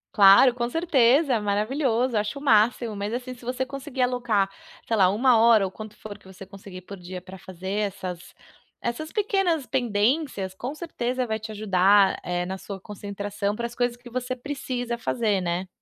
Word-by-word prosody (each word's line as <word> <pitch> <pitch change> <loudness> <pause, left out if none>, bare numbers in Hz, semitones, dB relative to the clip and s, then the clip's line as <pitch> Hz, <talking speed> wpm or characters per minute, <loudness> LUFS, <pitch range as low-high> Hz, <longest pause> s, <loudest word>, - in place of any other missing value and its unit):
Claro! 200 +5 +8
Com 240 -1 -2
certeza! 275 -4 +3
Maravilhoso! 235 +4 0
Eu - - +3
acho 210 +7 -5
o - - -8
máximo, 225 -3 +3
mas, 205 +2 -3
assim, 255 +1 -5
se 250 - -16
você 255 +2 -2
conseguir 270 -1 -3
alocar, 240 -6 +1 0.4
sei 230 - +1
lá, 190 -4 +5
1 235 +3 +4
hora 225 -3 +5
ou 190 - -5
quanto 215 0 -10
for 210 -2 -9
que - - -19
você 190 0 -11
conseguir 195 -1 -11
por 195 +1 -10
dia 180 +1 -7
pra 185 +1 -12
fazer 185 +1 -7 0.2
essas 180 -3 -8 0.4
essas 275 +7 -4
pequenas 390 - +1
pendências, 235 - 0
com 250 +9 -6
certeza 255 -6 -3
vai 220 -2 -2
te 220 0 -7
ajudar, 195 -1 +4
eh, 175 0 -2
na 190 +1 -4
sua 195 +1 -7
concentração 205 0 -4
para 235 - -3
as 235 - -5
coisas 245 -1 0
que 245 0 -13
você 255 +1 -3
precisa 245 -3 -4
fazer, 225 -4 0
né? 175 +1 -2
225 Hz, 185 wpm, -25 LUFS, 195-255 Hz, 0.4 s, Claro